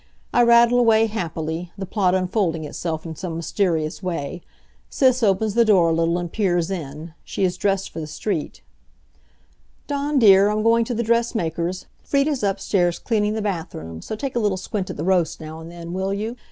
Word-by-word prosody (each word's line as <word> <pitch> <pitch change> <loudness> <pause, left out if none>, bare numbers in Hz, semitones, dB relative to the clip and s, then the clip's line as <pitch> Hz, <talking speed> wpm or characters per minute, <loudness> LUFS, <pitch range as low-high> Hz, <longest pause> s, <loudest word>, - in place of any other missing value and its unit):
I 245 - +5
rattle 235 +1 +6
away 225 -2 +5
happily, 170 -5 -4
the 195 - -4
plot 190 -2 +1
unfolding 185 -3 0
itself 160 +2 -4
in 160 -1 -6
some 165 0 -5
mysterious 165 -2 -1
way. 175 -2 -4 0.5
Sis 255 -2 +3
opens 210 0 +2
the 235 - +5
door 190 -7 +4
a - - +2
little 165 +1 +1
and 175 -2 -4
peers 180 -4 +1
in. 155 -2 -6
She - - -3
is 180 -1 +1
dressed 195 0 -1
for - - -6
the 155 - -5
street. 155 - -4 1.2
"Dawn 285 0 -1
dear, 200 -4 +7
I'm 215 0 0
going 230 0 +4
to 240 - -3
the 235 - 0
dressmaker's. 185 -7 -1 0.2
Frieda's 280 -1 0
upstairs 195 -3 +1
cleaning 210 -3 0
the 220 - -2
bathroom, 160 - -5
so 220 - -5
take 265 +3 -5
a - - +2
little 205 -4 +1
squint 190 0 -4
at - - -6
the 150 - -3
roast 180 -3 +1
now 160 0 -8
and 160 +1 -9
then, 170 0 -8
will 190 +1 -1
you? 220 +4 -4
190 Hz, 190 wpm, -22 LUFS, 165-220 Hz, 1.2 s, dear